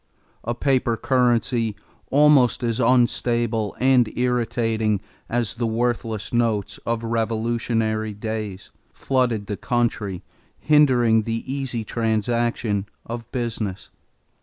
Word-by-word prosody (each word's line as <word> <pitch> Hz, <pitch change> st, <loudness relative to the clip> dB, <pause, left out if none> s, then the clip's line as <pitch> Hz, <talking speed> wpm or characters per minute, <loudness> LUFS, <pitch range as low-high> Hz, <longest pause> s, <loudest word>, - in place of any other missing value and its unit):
A 120 Hz, +1 st, -2 dB
paper 125 Hz, -3 st, +1 dB
currency, 120 Hz, -3 st, +1 dB, 0.3 s
almost 140 Hz, -4 st, +4 dB
as 115 Hz, 0 st, 0 dB
unstable 120 Hz, -3 st, +1 dB
and 125 Hz, -3 st, +4 dB
irritating 115 Hz, -3 st, 0 dB, 0.3 s
as 120 Hz, -2 st, -1 dB
the 120 Hz, 0 st, -2 dB
worthless 115 Hz, -2 st, -2 dB
notes 115 Hz, -4 st, 0 dB
of 115 Hz, 0 st, -1 dB
revolutionary 115 Hz, -1 st, -1 dB
days, 105 Hz, -3 st, -5 dB, 0.2 s
flooded 125 Hz, -6 st, 0 dB
the 105 Hz, -1 st, -4 dB
country, 115 Hz, -6 st, -1 dB, 0.3 s
hindering 125 Hz, -7 st, +4 dB
the 115 Hz, +1 st, -3 dB
easy 130 Hz, -4 st, -3 dB
transaction 115 Hz, -2 st, -1 dB, 0.2 s
of 115 Hz, 0 st, -7 dB
business. 110 Hz, -5 st, -4 dB
115 Hz, 100 wpm, -23 LUFS, 110-120 Hz, 0.3 s, almost